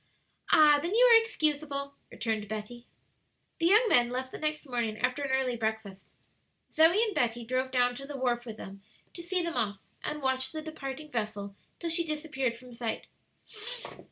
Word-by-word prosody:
"Ah, 295 -1 +7
then, 345 +7 -2
you - - +7
are 455 - +9
excusable," 290 -8 -1 0.2
returned 220 -2 -2
Betty. 220 +3 -7 0.7
The 335 - +3
young 430 +7 +6
men 240 - +5
left 260 +1 -3
the - - -7
next 305 0 -1
morning, 235 -5 -2
after 250 +5 0
an 280 - -2
early 265 -2 +1
breakfast. 220 -4 -4 0.6
Zoe 335 +7 +5
and 435 -3 -1
Betty 240 -6 0
drove 255 +2 -1
down 245 -1 +2
to 275 +2 -8
the 285 -1 -6
wharf 245 -2 -1
with 220 -1 -7
them 195 -1 -9 0.3
to 345 - -7
see 355 +1 0
them 335 0 -2
off, 210 -4 0 0.3
and 300 -1 -3
watched 260 0 0
the 310 - -4
departing 300 -1 -7
vessel 210 -4 -4 0.2
till 335 -1 -3
she 335 +1 +2
disappeared 300 -6 -2
from 250 0 -13
sight. 235 -1 -4
260 Hz, 180 wpm, -30 LUFS, 235-310 Hz, 0.7 s, are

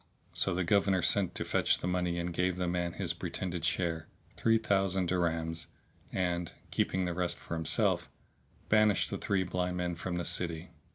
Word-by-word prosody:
So 95 - +1
the 95 - +1
Governor 95 0 +3
sent 95 -4 +2
to - - -2
fetch - - +3
the - - -5
money 90 -1 0
and 85 0 -2
gave 90 +1 +1
the 90 -1 0
man 85 -1 -1
his - - -2
pretended 90 -2 -4
share, 80 -3 0 0.3
three 115 0 +3
thousand 95 -4 +1
dirhams; 85 -2 -1 0.4
and, 90 -2 -1 0.2
keeping 95 0 +1
the 90 - -1
rest 90 0 0
for - - -7
himself, 80 -1 +1 0.6
banished 110 -2 +4
the - - -3
three 95 -2 +1
blind 90 0 -2
men 90 -1 -1
from 85 +1 -4
the 85 - -2
city. 85 0 -1
90 Hz, 175 wpm, -32 LUFS, 85-95 Hz, 0.6 s, banished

